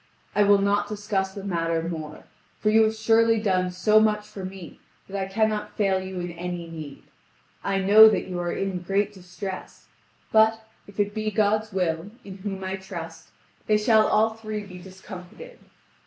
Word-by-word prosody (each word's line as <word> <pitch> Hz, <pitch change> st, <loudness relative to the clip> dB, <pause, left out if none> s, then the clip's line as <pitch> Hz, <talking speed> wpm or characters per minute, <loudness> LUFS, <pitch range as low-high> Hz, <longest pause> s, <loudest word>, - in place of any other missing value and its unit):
I 210 Hz, -, +2 dB
will 205 Hz, 0 st, +6 dB
not 200 Hz, +1 st, +1 dB
discuss 205 Hz, -2 st, -2 dB
the 200 Hz, -, -7 dB
matter 165 Hz, -3 st, -1 dB
more, 155 Hz, -3 st, -6 dB, 0.4 s
for 215 Hz, -, +2 dB
you 220 Hz, +1 st, +6 dB
have 220 Hz, 0 st, 0 dB
surely 225 Hz, +1 st, +3 dB
done 185 Hz, -4 st, +1 dB
so 200 Hz, +4 st, +3 dB
much 210 Hz, -1 st, +1 dB
for 195 Hz, -, -9 dB
me 185 Hz, -3 st, -9 dB, 0.3 s
that 195 Hz, -, -8 dB
I 195 Hz, -1 st, -3 dB
cannot 215 Hz, 0 st, -1 dB
fail 195 Hz, -2 st, +2 dB
you 190 Hz, -1 st, -6 dB
in 175 Hz, 0 st, -4 dB
any 175 Hz, 0 st, -5 dB
need. 155 Hz, -4 st, -9 dB, 0.6 s
I 195 Hz, 0 st, 0 dB
know 215 Hz, +3 st, +9 dB
that -, -, -1 dB
you 180 Hz, -1 st, -5 dB
are 175 Hz, 0 st, -2 dB
in 195 Hz, -2 st, -2 dB
great 195 Hz, +3 st, -1 dB
distress; 185 Hz, +1 st, -8 dB, 0.4 s
but, 220 Hz, 0 st, +3 dB, 0.2 s
if 200 Hz, 0 st, -13 dB
it 205 Hz, 0 st, +1 dB
be 215 Hz, 0 st, -2 dB
God's 215 Hz, +1 st, +1 dB
will, 175 Hz, -1 st, -1 dB
in 195 Hz, -1 st, -10 dB
whom 195 Hz, -1 st, -5 dB
I 190 Hz, +1 st, -3 dB
trust, 170 Hz, -4 st, -9 dB, 0.4 s
they 215 Hz, -, +4 dB
shall 215 Hz, 0 st, +4 dB
all 220 Hz, +1 st, +3 dB
three 215 Hz, -1 st, -6 dB
be 180 Hz, -2 st, -11 dB
discomfited. 190 Hz, -, -11 dB
195 Hz, 180 wpm, -25 LUFS, 180-215 Hz, 0.6 s, know